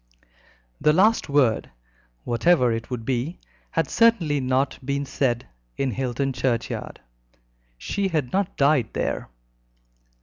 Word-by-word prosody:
The 150 - +4
last 210 +2 +3
word 135 -6 +2 0.5
whatever 125 +1 +3
it 115 0 -3
would 120 -3 -5
be 130 +7 -2 0.3
had 165 - 0
certainly 190 -11 +3
not 130 +1 0
been 140 +1 -2
said 120 -3 -1 0.3
in 135 -2 0
Hilton 130 +3 -2
churchyard. 120 -1 -2 0.8
She 200 - -2
had 155 -9 -2
not 195 -1 -1
died 140 -5 +3
there. - - -2
135 Hz, 115 wpm, -24 LUFS, 125-160 Hz, 0.8 s, The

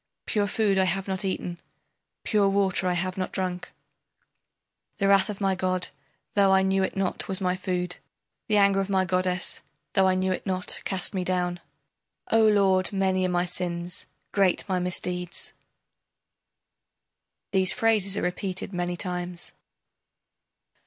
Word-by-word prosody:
Pure 205 -2 +1
food 200 -1 +2
I 190 - +4
have 190 +2 -1
not 190 0 0
eaten, 180 -2 -3 0.6
Pure 205 -3 +3
water 195 -2 +1
I 180 - +2
have 185 +2 -2
not 185 - -2
drunk, 180 -2 -3 1.3
The 200 - +1
wrath 195 0 +5
of 205 - -5
my 195 -2 +2
god, 185 -1 0 0.4
though 200 -1 +4
I 190 0 +5
knew 190 0 +2
it 190 - -2
not, 190 -2 -1
was 190 - +1
my 180 -1 0
food, 180 -1 -2 0.5
The 215 -3 +3
anger 200 -1 +4
of 195 0 -1
my 190 -1 +2
goddess, 185 +1 -1 0.3
though 195 -3 +4
I 185 - +3
knew 185 0 0
it 185 - -2
not, 185 -2 -1
cast 190 0 -1
me 185 -2 -1
down. 180 -1 -1 0.7
O 225 0 +5
lord, 195 -3 +3
many 190 -2 +1
are - - -2
my 175 0 +1
sins, 175 -1 -4 0.2
great 195 -1 +2
my 185 -2 0
misdeeds. 180 0 0 2.0
[These 190 -2 +3
phrases 215 -4 +2
are - - -1
repeated 180 +2 -3
many 175 0 -2
times. 180 -1 -3
185 Hz, 150 wpm, -26 LUFS, 180-195 Hz, 2.0 s, wrath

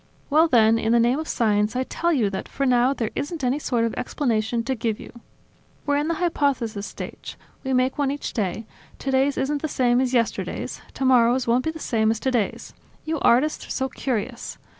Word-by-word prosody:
Well 315 +3 +5
then, 230 -5 +4
in 225 +1 +1
the 235 - +5
name 240 +5 +2
of 315 - -5
science, 210 -1 +1
I 255 - +1
tell 340 +6 -1
you 230 -11 +1
that, 190 - -4
for 275 - -2
now, 250 0 +4
there 235 -5 -2
isn't 305 0 -4
any 255 +3 +1
sort 240 -5 0
of 230 - -2
explanation 230 -4 -1
to 265 - -1
give 225 -3 -2
you. - - -11 0.7
We're 285 -1 +2
in 295 +1 0
the 335 - 0
hypothesis 270 - -1
stage. - - -8 0.3
We 265 - -2
make 255 +3 +1
one 280 -2 +2
each 285 +1 -4
day; 215 0 -2 0.3
today's 270 +1 +1
isn't 285 +2 -1
the 315 - -1
same 250 -3 +2
as 255 -1 0
yesterday's; 235 -3 -1
tomorrow's 255 -1 +3
won't 240 +3 +2
be - - +1
the 320 - -9
same 220 -7 +1
as 220 0 0
today's. 245 -5 -1 0.3
You 315 -1 -2
artists 270 +6 +2
are - - -17
so 265 0 -1
curious! 245 -2 -4
255 Hz, 205 wpm, -24 LUFS, 230-280 Hz, 0.7 s, Well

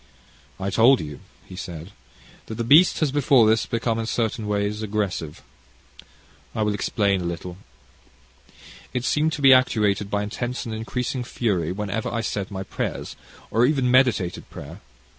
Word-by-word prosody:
"I 95 +1 -2
told 120 +6 +5
you," 75 -2 -7 0.3
he 95 - -11
said, 90 -1 -7 0.6
"that 110 - -6
the 115 - -2
beast 155 +11 +5
has 150 -4 +2
before 135 -4 +4
this 110 +1 +2
become 115 -1 -1
in 115 - -3
certain 115 -1 -1
ways 105 +1 -1
aggressive. 100 -7 -3 1.1
I 110 - 0
will 105 -1 0
explain 100 -2 0
a - - -4
little. 85 +1 -5 1.4
It 125 0 -1
seemed 155 +3 +2
to 145 - -5
be 135 -1 +9
actuated 105 -5 +2
by 105 0 -1
intense 120 +4 -4
and 115 - -5
increasing 125 +3 -3
fury, 100 -10 -1
whenever 105 +3 -3
I 115 - -1
said 100 -3 -3
my 95 -2 -5
prayers, - - -4 0.4
or 115 +2 +3
even 130 -2 +2
meditated 120 -9 +2
prayer. - - -10
110 Hz, 160 wpm, -23 LUFS, 100-125 Hz, 1.4 s, be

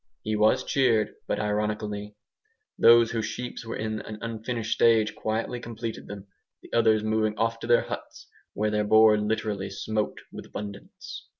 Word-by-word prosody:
He 110 0 -1
was 105 +1 +3
cheered, 120 -6 +2
but - - -1
ironically. 105 0 -2 0.6
Those 115 0 +6
whose 110 -2 -1
sheep 120 +3 -6
were 115 - -5
in 110 0 -3
an 110 - -8
unfinished 115 0 -3
stage 115 -2 +4
quietly 115 +3 -2
completed 115 -1 -6
them; 100 -1 -8 0.4
the - - -15
others 110 -2 +4
moving 110 0 0
off 115 0 0
to 115 - -6
their 120 0 +4
huts, - - -8 0.3
where 105 +1 0
their 105 0 +1
board 110 0 +5
literally 105 -2 -2
smoked 105 +2 -3
with - - -9
abundance. 100 -1 -8
110 Hz, 160 wpm, -26 LUFS, 105-115 Hz, 0.6 s, Those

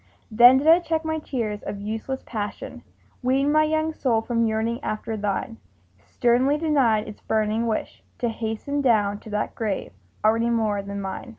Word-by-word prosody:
Then 240 +4 +8
did 275 - -1
I 325 +2 +7
check 320 -2 -2
my 315 0 -1
tears 225 -8 -3
of 200 - -6
useless 220 +6 -4
passion, 210 -3 -5 0.4
Weaned 270 +3 +2
my 310 0 +4
young 315 +1 0
soul 230 -7 0
from 230 -1 +1
yearning 225 +2 -1
after 215 +1 -3
thine, 210 +2 -3 0.4
Sternly 245 - +2
denied 270 -9 +2
its 215 - -10
burning 220 +1 0
wish 220 - -3 0.2
to 240 - -1
hasten 225 +6 -3
Down 205 -6 +2
to 220 - -12
that 210 0 -2
grave 215 -4 -3 0.3
already 230 +2 +3
more 220 -3 0
than 200 0 -6
mine! 195 +6 -6
230 Hz, 170 wpm, -24 LUFS, 215-270 Hz, 0.4 s, Then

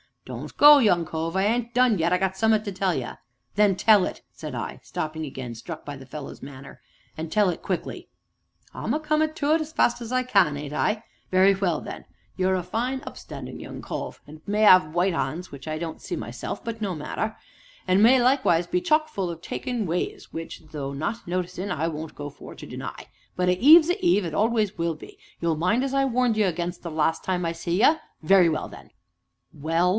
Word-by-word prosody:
"Don't - - -8
go, 295 0 +9
young 180 -9 +3
cove; 165 +2 -3
I 190 - +2
ain't 235 +3 0
done 245 -5 +3
yet, 165 - +2
and - - +5
I - - +2
got 190 0 -1
summ'at 220 0 +3
to 200 - -3
tell 185 -1 0
ye." 125 - -3 0.5
"Then 205 -1 +4
tell 205 0 +5
it!" - - -6
said - - -7
I, - - -5
stopping 155 0 -4
again, 130 -4 -6
struck 155 +8 -8
by 145 - -6
the 135 - -12
fellow's 135 +2 -8
manner, 135 -2 -11 0.4
"and 160 0 -5
tell 205 0 +3
it 175 - -4
quickly." - - -4 0.7
"I'm - - -3
a 305 - 0
comin' 310 0 +1
to 300 -1 +1
it 325 - +2
as 315 0 -6
fast 240 -4 +2
as 235 0 -6
I 255 0 +1
can, 190 - +3
ain't 145 0 -6
I? 215 +7 0 0.3
Very 190 +1 +5
well 185 -5 0
then! - - -8 0.3
You're 190 0 +2
a 180 - -2
fine, 245 +8 -2
up - - -8
standin' - - -8
young - - -8
cove, - - -6
and 155 +1 -13
may 210 +1 +2
'ave 185 -5 +8
white 175 +3 +1
'ands 165 +4 -3
(which 140 +1 -10
I 155 0 -2
don't 160 0 -6
see - - -4
myself, 120 - -6
but 225 -1 -5
no 195 -4 -2
matter) 215 +8 -3 0.5
and 185 +2 +4
may 250 +4 +7
likewise 245 -10 +3
be 180 - +1
chock 310 - +2
full 195 - -3
o' 170 - -4
taking 230 +7 -4
ways 175 +1 -3
(which, 165 0 -7
though 140 -3 -4
not 160 +11 -4
noticin', 180 +2 -3
I 165 -1 -1
won't 155 0 -7
go 145 0 -6
for 140 - -12
to - - -10
deny) - - -7 0.3
but 180 0 +1
a 180 0 +1
Eve's 315 - +8
a 365 +2 -1
Eve, 210 - +3
and 160 -2 -4
always 215 -2 +1
will 165 -1 -1
be 155 - -13 0.2
you'll 165 -2 +1
mind 210 +10 +1
as 275 0 -2
I 275 0 +3
warned 250 -3 +1
you 215 - +3
again' 175 0 -2
'em 165 -2 -5
last 160 +1 +1
time 180 -2 -1
I 165 - 0
see 170 +3 -2
ye? 315 - +6 0.3
very 180 +1 +5
well 155 - -2
then!" - - -13 0.6
"Well?" 165 +4 +1
185 Hz, 220 wpm, -25 LUFS, 160-225 Hz, 0.7 s, go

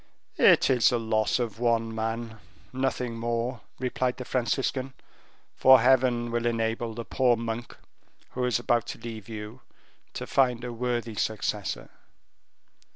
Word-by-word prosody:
"It - - +6
is 125 -3 +5
the 120 - 0
loss 110 -1 +1
of 115 -4 -3
one 115 -2 +1
man 115 0 -4 0.3
nothing 125 -3 -2
more," 120 0 -2 0.2
replied 125 0 -1
the 125 - -6
Franciscan, 130 +2 -1 0.6
"for 130 0 +7
Heaven 120 -1 +3
will 120 0 0
enable 115 0 -1
the 115 0 -5
poor 125 -2 +2
monk, 115 0 -5 0.5
who 125 0 -2
is 125 -2 +2
about 120 -1 0
to - - -5
leave 115 -3 -8
you, 110 +2 -7 0.5
to - - -5
find 125 -3 +2
a 120 -1 -4
worthy 120 -1 -2
successor. 110 +1 -2
120 Hz, 140 wpm, -27 LUFS, 115-125 Hz, 0.6 s, for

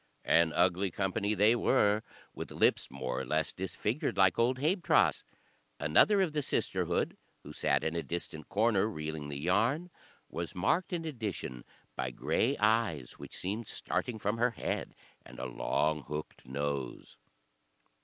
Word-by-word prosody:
An 85 0 +4
ugly 95 +2 +2
company 100 +3 -1
they 105 +4 +5
were, 105 -2 +3 0.3
with - - -6
lips - - +2
more 65 -1 -3
or - - -3
less 75 +4 0
disfigured, 100 +4 -2
like 95 0 +4
old 125 +2 +3
Habetrot's. 170 +7 +3 0.6
Another 195 - +5
of 165 -5 -2
the 150 - +1
sisterhood, - - 0 0.3
who - - -9
sat - - +1
in 80 +1 -1
a 85 - 0
distant 80 -3 -6
corner 105 -1 +3
reeling 75 -6 -5
the 70 - -4
yarn, 115 - +1 0.4
was 85 0 -5
marked, 160 - +1
in 170 -2 -2
addition, 105 - -4 0.3
by 65 - -2
grey 120 - 0
eyes, 105 - +1
which - - -8
seemed 105 +4 -3
starting 120 -3 -2
from 105 +2 -1
her 120 +1 +4
head, 115 - -4 0.3
and - - -13
a - - -4
long 75 0 0
hooked 75 -3 -6
nose. 70 -1 -4
95 Hz, 150 wpm, -31 LUFS, 75-115 Hz, 0.6 s, they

